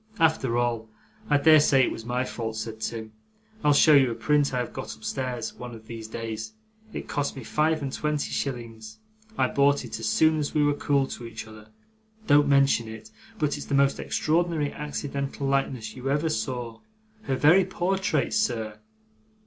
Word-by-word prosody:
'After 155 - +2
all, 120 -2 -1 0.4
I 145 - +5
dare 155 +2 +7
say 135 -3 +4
it - - +1
was 115 - -7
my 125 +1 -1
fault,' 110 -3 -4
said 110 0 -6
Tim. 110 -1 -4 0.5
'I'll 150 - +5
show 155 - +6
you 135 -3 +6
a 115 - -3
print 145 +5 +2
I 125 - -2
have 125 -1 -3
got - - -6
upstairs, 130 -2 -4
one 125 -1 -8
of 110 -1 -13
these 115 -1 -8
days. 110 -1 -5 0.4
It - - -6
cost 145 -1 -2
me 135 - -6
five 155 +5 +1
and 135 - -4
twenty 150 -1 -2
shillings. 115 -5 -5 0.4
I - - +3
bought 140 -1 +2
it 115 - -11
soon 115 +9 +2
after 150 +1 -2
we 150 - +4
were 145 - +3
cool 140 -1 +1
to 120 -3 -7
each 115 0 -8
other. 110 -1 -13 0.6
Don't 145 -3 +5
mention 140 -4 +3
it, 110 0 -10 0.3
but 150 -5 0
it's 145 - -8
the 140 - 0
most 140 0 +3
extraordinary 160 -2 0
accidental 140 -1 -4
likeness 135 -5 -1
you 130 +1 -4
ever 150 +3 +1
saw 120 -2 -3 0.5
her 135 - 0
very 160 +8 +5
portrait, 190 +2 -1
sir! 110 - -1
135 Hz, 180 wpm, -26 LUFS, 115-145 Hz, 0.6 s, dare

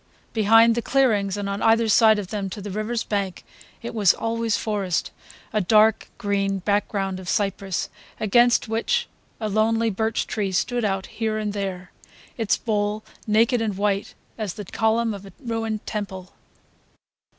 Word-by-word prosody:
Behind 225 +1 +5
the 235 - -1
clearings, 215 -7 +2
and 205 -1 -3
on 200 +1 -3
either 225 0 +4
side 220 0 +6
of 200 -3 -5
them 200 -2 -3
to 195 - -7
the 205 0 -6
river's 215 +3 -2
bank, 200 -3 -3 0.4
it 235 - -5
was 205 -5 +4
always 230 -1 -1
forest: 200 -5 -1 0.4
a 215 - +2
dark 215 +3 +4
green 200 -3 0
background 195 -1 -1
of 180 -2 -7
cypress 195 -2 -1 0.3
against 240 +3 +4
which 235 - 0 0.3
a 220 - -2
lonely 225 +2 +2
birch 220 +3 -1
tree 200 -3 -2
stood 240 +6 0
out 195 -2 -1
here 220 -1 -2
and 210 -1 -2
there, 190 -3 -4 0.4
its 225 -4 +1
bole 210 -1 -1 0.2
naked 225 +3 +3
and 210 -4 -2
white 200 0 -1 0.2
as 210 -5 -3
the 210 -1 -7
column 225 +3 +1
of 200 -1 -8
a - - -13
ruined 225 -4 -3
temple. 190 -3 -5
215 Hz, 160 wpm, -23 LUFS, 200-225 Hz, 0.4 s, side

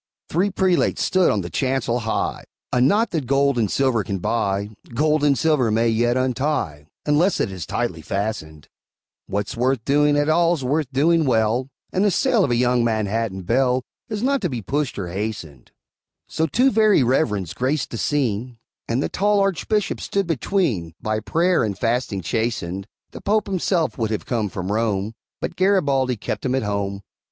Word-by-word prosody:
Three 185 +5 +1
prelates 190 -2 +1
stood 185 -1 +3
on 105 - +1
the 85 - -6
chancel 130 -3 0
high: 110 -1 -2 0.3
A 125 - +3
knot 205 - +3
that 155 -7 -2
gold 140 -1 +2
and 110 -3 +1
silver 130 -4 +1
can 100 -1 -3
buy, 100 +1 -1 0.2
Gold 150 +2 +2
and 140 -2 +3
silver 145 -3 +2
may 115 +2 +2
yet 120 +2 +2
untie, 130 - -1 0.2
Unless 155 +6 +2
it 100 - 0
is 90 -6 -6
tightly 80 - -2
fastened; 80 -6 -4 0.6
What's 100 +1 -3
worth 125 -1 0
doing 145 +1 +3
at 145 0 +2
all's 165 -1 +2
worth 140 +1 0
doing 160 +4 +3
well, 120 +1 +1 0.2
And 185 - +2
the 205 - +4
sale 230 +2 +2
of - - +1
a 120 - +2
young 125 0 +2
Manhattan 110 -3 -1
belle 125 +5 +1 0.3
Is 215 0 -3
not 275 +1 +1
to 180 - 0
be 120 -6 -4
pushed 145 +4 -2
or 95 -3 -3
hastened; 90 - -5 0.6
So 160 0 -1
two 250 - +3
Very 215 -8 +4
Reverends 110 - 0
graced 130 +3 -1
the 115 - -4
scene, 125 -4 -1 0.3
And 120 +4 0
the - - 0
tall 205 +1 +2
Archbishop 195 +2 0
stood 200 -1 -1
between, 145 - -1
By 110 0 -1
prayer 165 - +1
and 100 -3 -2
fasting 115 -3 -1
chastened; 100 -4 -2 0.2
The - - -9
Pope 210 +1 +1
himself 180 -6 0
would 110 -2 0
have 110 - -3
come 110 -4 -1
from 95 +1 -4
Rome, 105 -1 0 0.3
But - - -4
Garibaldi 140 - +2
kept - - -4
him 130 -1 0
at 135 - 0
home. 100 -1 -2
125 Hz, 180 wpm, -22 LUFS, 110-155 Hz, 0.6 s, the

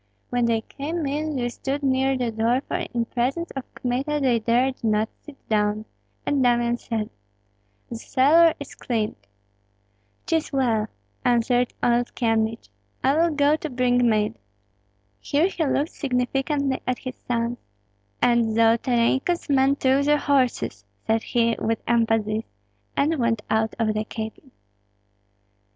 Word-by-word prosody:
When 245 -1 +2
they 230 -1 +1
came 305 +7 -4
in 300 +2 -2
they 245 -2 -1
stood 275 +4 -4
near 265 0 +2
the 245 -2 -1
door, 230 +4 +1
for - - -1
in 235 -1 -1
presence 260 +9 -2
of 270 -2 -6
Kmita 265 +4 -1
they 255 -4 +2
dared 245 +4 +1
not 215 0 +1
sit 295 -2 -13
down; 210 0 +1 0.4
and 285 -2 +1
Damian 240 -1 +2
said, 220 -2 -3 0.8
"The 235 - -6
cellar 310 +8 +4
is 285 - -8
cleared." 220 -3 -2 1.1
"'Tis 325 -1 0
well," 235 -6 +1 0.4
answered 245 0 +2
old 240 0 +1
Kyemlich, 225 -1 0 0.3
"I 270 +2 +3
will 335 +2 +3
go 290 +1 +4
to 315 - -5
bring 245 -1 +2
mead." 215 0 +1 0.9
Here 295 +3 +1
he 350 - -2
looked 285 +3 0
significantly 270 +1 -1
at 255 -1 0
his 255 -1 -7
sons. 235 0 -1 0.6
"And 235 -2 +3
Zolotarenko's 235 +8 +2
men 270 0 +4
took 270 0 +2
the 295 0 +4
horses," 275 -4 0 0.2
said 225 0 +2
he, 230 -1 +1
with 225 0 0
emphasis; 225 -2 +1 0.5
and 305 +2 +2
went 230 -3 +1
out 220 0 +1
of 220 -2 +1
the 215 0 -2
cabin. 220 +5 -7
245 Hz, 140 wpm, -24 LUFS, 230-275 Hz, 1.1 s, cellar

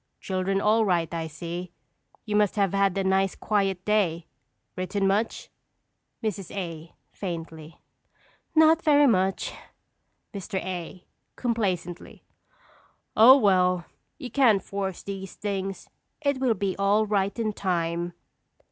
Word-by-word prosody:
Children 190 +1 -1
all 215 +2 +3
right, 175 -5 0
I 165 -1 -3
see. 170 +3 -6 0.5
You 210 - -2
must 210 -2 +3
have 200 -3 +1
had 195 -1 +2
a 195 - +1
nice, 190 0 +1
quiet 195 -3 -1
day. 180 -6 +1 0.5
Written 195 +2 -1
much? 205 +4 -1 0.7
Mrs. 200 -4 -3
A. 165 -4 -6 0.2
(faintly). 165 -4 -7 0.8
Not 320 +1 +6
very 290 -2 +5
much. 190 -6 +1 0.8
Mr. 195 -1 -6
A. 180 -1 -6 0.3
(complacently). 190 -8 -3 0.9
Oh, 245 +5 +9
well, 180 -6 +3 0.3
you 260 -6 -8
can't 225 -9 +4
force 195 -2 -4
these 195 -1 -7
things. 195 -1 -4 0.3
It 280 -3 0
will 255 -4 +2
be 195 -3 -2
all 200 +2 +3
right 200 -1 0
in 220 -2 -1
time. 175 -2 -2
195 Hz, 120 wpm, -26 LUFS, 180-210 Hz, 0.9 s, Oh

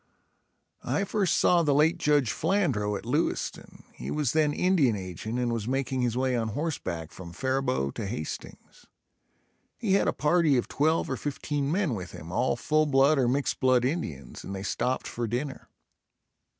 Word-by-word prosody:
I 200 - 0
first 195 -3 +1
saw 175 -1 +4
the 145 -4 +2
late 160 +4 +3
Judge 145 -7 +3
Flandrau 135 - 0
at - - -10
Lewiston, - - -2
he - - -7
was 150 -5 0
then 155 -2 +3
Indian 155 - +2
agent 95 +4 -5
and 120 -1 0
was 115 -2 -3
making 130 0 -1
his 120 -1 0
way 130 -1 +1
on 115 -2 0
horseback 110 - -3
from 90 -2 -10
Faribault 130 - -1
to 105 - -3
Hastings. 95 -7 -7 0.9
He 215 -5 0
had 200 - +3
a - - +4
party 150 -2 +3
of 120 - -1
twelve 160 +3 +1
or 130 - -2
fifteen 145 0 -2
men 180 -6 +1
with 95 -5 -6
him, 80 +2 -9
all 120 +7 +1
full 155 +6 +1
blood 140 +1 +4
or 125 - +3
mixed 135 +3 0
blood 130 -2 +3
Indians, 80 - -4
and 95 - -6
they 95 - -5
stopped 125 +5 -1
for 120 -1 -3
dinner. 130 +5 -4
130 Hz, 175 wpm, -28 LUFS, 115-150 Hz, 0.9 s, saw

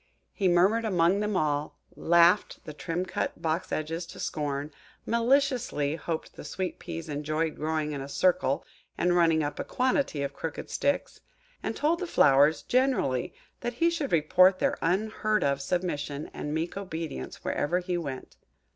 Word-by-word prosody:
He 195 - +1
murmured 190 +6 +4
among 185 -2 +2
them 210 -2 0
all–laughed 170 +4 +2
the 155 - -7
trim 165 +4 -3
cut 180 - -3
Box 165 +2 -2
edges 165 +2 -3
to - - -11
scorn–maliciously 155 - -1
hoped 165 -1 -4
the - - -10
Sweet 180 +5 -4
peas 165 -2 -6
enjoyed 155 +2 -2
growing 155 0 -1
in 140 -2 -4
a 135 - -7
circle, 140 -4 +1 0.3
and 175 0 +2
running 165 -2 +4
up 145 0 -4
a - - -1
quantity 255 - 0
of 140 0 -3
crooked 160 +1 -6
sticks–and - - -3
told 320 +3 +1
the 365 - -3
flowers, 145 - +4
generally, 255 - +1 0.2
that 240 0 -3
he 335 +8 +2
should 315 -5 -2
report 185 +4 +5
their - - +1
unheard 215 +4 +1
of 140 0 +1
submission 145 -2 -2
and 150 - -5
meek 160 +3 -2
obedience 165 - -6
wherever 170 +5 0
he 180 0 -2
went. 140 -7 -5
170 Hz, 150 wpm, -28 LUFS, 150-205 Hz, 0.3 s, report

